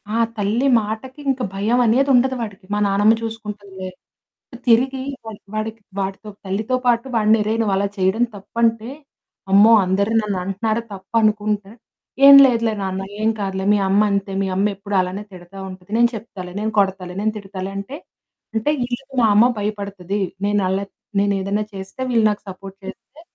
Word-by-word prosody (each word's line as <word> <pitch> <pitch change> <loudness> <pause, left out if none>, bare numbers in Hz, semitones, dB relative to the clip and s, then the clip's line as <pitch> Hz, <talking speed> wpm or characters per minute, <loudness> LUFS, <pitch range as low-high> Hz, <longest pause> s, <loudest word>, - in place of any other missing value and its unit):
ఆ - - +1 0.2
తల్లి 220 +7 +1
మాటకి 220 +6 -6
ఇంక 265 -1 0
భయమనేది 240 +6 +2
ఉండదు 260 +1 +3
వాడికి. 205 -3 -7
"మా 210 - +1
నానమ్మ 205 +3 +4
చూసుకుంటుందిలే." 205 -4 -7 0.8
తిరిగి 260 +3 +3 0.2
వాడి 220 -2 -8 0.2
వాడికి 215 +1 -4 0.2
వాడితో 195 +2 -4 0.2
తల్లితో 210 +6 -1
పాటు 235 +1 +2
వాడిని 220 0 +4
అరేయి, 220 +2 -1
నువ్వలా 200 -1 +1
చేయడం 190 +5 +2
తప్పంటే 225 +3 -1 0.6
అమ్మో! 205 +4 +7
అందరూ 200 +3 0
నన్నంటున్నారా 205 +3 -2
తప్పనుకుంటే, 210 0 0 0.6
"ఏం 280 0 +11
లేదులే 230 -3 +1
నాన్న, 190 0 -3 0.2
ఏం 220 - +3
కాదులే, 190 -1 -3
మీ 205 - +2
అమ్మ 200 +2 +4
అంతే, 200 0 -1
మీ 195 - 0
అమ్మెప్పుడు 200 +1 -1
అలానే 185 +3 -4
తిడతా 180 +1 -13
ఉంటది 185 +1 -12
నేను 235 0 +5
చెప్తాలే, 195 -5 -8
నేను 220 +1 -1
కొడతాలే, 190 -2 -1
నేను 215 +1 0
తిడతాలే." 195 -1 -6
అంటే, 200 +9 -6 0.6
అంటే 220 +6 0 0.2
ఈళ్ళకి 265 +3 -7
మా 225 - +5
అమ్మ 230 +4 +6
భయపడుతది 200 -2 -3 0.3
నేను 205 -1 +1
అల్లరి 195 +1 -2 0.3
నేనేదైనా 200 +1 0
చేస్తే 195 +6 -8
వీళ్ళు 230 -2 +3
నాకు 205 - -5
సపోర్ట్ 195 +1 -10
చేస్తే 285 +9 -11
210 Hz, 150 wpm, -20 LUFS, 195-225 Hz, 0.8 s, ఏం